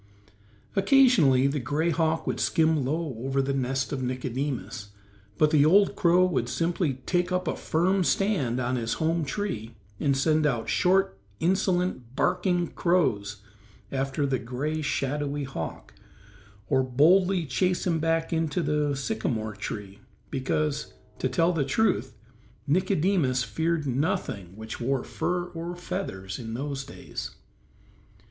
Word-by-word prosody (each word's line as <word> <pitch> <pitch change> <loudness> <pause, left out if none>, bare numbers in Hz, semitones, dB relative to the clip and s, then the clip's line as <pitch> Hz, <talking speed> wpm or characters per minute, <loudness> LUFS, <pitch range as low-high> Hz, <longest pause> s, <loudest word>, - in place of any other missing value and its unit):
Occasionally 195 - +5
the 140 +1 +1
gray 150 +7 0
hawk 160 0 0
would - - -2
skim 160 -3 +2
low 155 +2 -2
over 135 +2 -1
the 135 0 +1
nest 130 0 -1
of 135 - -2
Nicodemus, 130 -3 -3 0.5
but 155 0 +4
the 150 -3 +5
old 195 +6 +5
crow 180 +1 +4
would 130 -10 0
simply 165 -1 0
take 180 0 0
up 180 -1 -1
a - - 0
firm 185 +4 +1
stand 165 - +1
upon 125 0 0
his 115 -1 -1
home 165 +1 0
tree 135 - -4 0.2
and 140 -2 +1
send 155 +2 +3
out 120 -5 -1
short, 185 - +2 0.2
insolent, 180 - 0
barking 180 0 +1
crows 105 - 0 0.5
after 135 +2 -1
the 135 -2 0
gray, 145 +6 -3
shadowy 145 0 -1
hawk, 85 - -6 0.7
or 135 -2 +3
boldly 170 +8 +3
chase 180 +6 0
him 165 -3 +1
back 165 +1 +1
to 165 0 0
the 150 -2 +1
sycamore 120 - -2
tree 105 -1 -6 0.3
because, 145 +3 -1 0.2
to 130 - 0
tell 165 +7 +2
the 155 -4 +1
truth, 220 +12 0 0.5
Nicodemus 170 -5 +2
feared 160 +3 -1
nothing 130 - -2
which 110 +3 -7
wore 130 +1 0
fur 175 0 -2
or 170 +1 -5
feathers 95 - -5
in 115 -2 -5
those 140 +1 -3
days. - - -7
150 Hz, 135 wpm, -27 LUFS, 130-175 Hz, 0.7 s, Occasionally